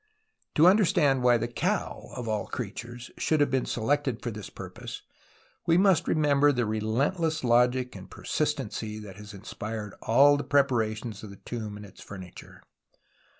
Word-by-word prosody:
To 155 - +6
understand 165 -9 +4
why 125 -1 +5
the 115 +1 -2
cow, 120 - -2
of 120 -2 -5
all 110 -1 -1
creatures, 120 +2 -6
should 155 - +2
have 145 -2 +3
been 130 -1 0
selected 130 +1 0
for 120 - -2
this 105 -2 -8
purpose, - - -8 0.6
we 165 0 +5
must 190 -2 +4
remember 145 -2 +4
the 125 -4 0
relentless 130 - 0
logic 125 +1 +2
and 95 -1 -10
per - - -13
sistency 110 -1 -2
that 100 -3 -10
inspired 105 +1 -7
all 140 +5 +5
the 145 - -3
preparations 115 -5 0
of 110 - -9
the 100 - -10
tomb 110 0 -6
and 105 - -9
its 95 - -15
furniture. 95 -3 -11
120 Hz, 155 wpm, -28 LUFS, 110-145 Hz, 0.6 s, To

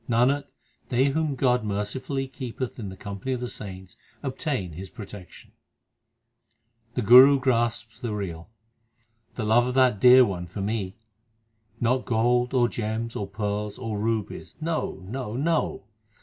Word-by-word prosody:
Nanak, 130 +5 +3 0.4
they 130 +2 +3
whom 155 0 0
God 125 -2 +2
mercifully 110 +7 -3
keepeth 130 -1 -6
in 105 -4 -5
the 95 - -10
com 100 0 -7
pany 130 +5 -2
of - - -5
the 125 - -3
saints, 95 -5 -9 0.3
obtain 130 - -3
His 90 +4 -8
protection. 100 -3 -11 1.4
The 125 - 0
Guru 130 +6 +9
grasps 120 -2 0
the 120 - -4
real: 85 -3 -5 0.9
The 110 - -3
love 120 +3 +4
of 125 - -3
that 130 -6 +4
Dear 125 +3 +8
One 90 -4 -4
for 95 +4 -6
me! 100 -2 -2 0.8
Not 125 +2 +1
gold, 120 +1 +2
or 120 -2 +4
gems, 115 0 -3
or 100 - -3
pearls, 105 0 -3
1 120 -3 -5
or 105 - -2
rubies; 110 -1 -3
no, 155 - -3
no, 120 0 -5
no 160 -4 0
115 Hz, 150 wpm, -26 LUFS, 105-130 Hz, 1.4 s, Guru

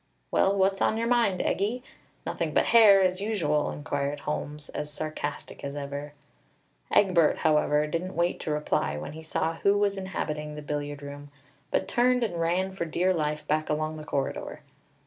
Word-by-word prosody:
"Well, 195 +1 +3
what's 195 0 +2
on 220 - +2
your 230 - 0
mind, 235 -6 +2
Eggie? 225 +6 -1 0.4
Nothing - - -2
but - - +4
hair, 205 -4 +8
as 185 +1 +1
usual!" 165 -9 0
inquired 145 -1 -3
Holmes, 150 0 -4
as 150 0 -5
sarcastic 155 +1 -5
as 140 0 -4
ever. 145 +1 -5 0.8
Egbert, 180 -6 +4
however, 150 -1 +3
didn't 170 +5 -3
wait 170 +1 +1
to - - -5
reply 150 - 0
when 75 - -6
he 160 - -9
saw 160 +1 -2
who 200 +3 +3
was 200 -1 +1
inhabiting 150 -5 -4
the 150 - -7
billiard 145 -1 -4
room; 145 0 -8 0.4
but - - 0
turned 250 0 +3
and 175 -7 -2
ran 180 +3 +1
for 190 -3 -3
dear 180 +3 +1
life 150 -2 -2
back 155 +1 0
along 155 +1 -1
the 155 - -7
corridor. 140 -2 -3
155 Hz, 170 wpm, -27 LUFS, 150-190 Hz, 0.8 s, hair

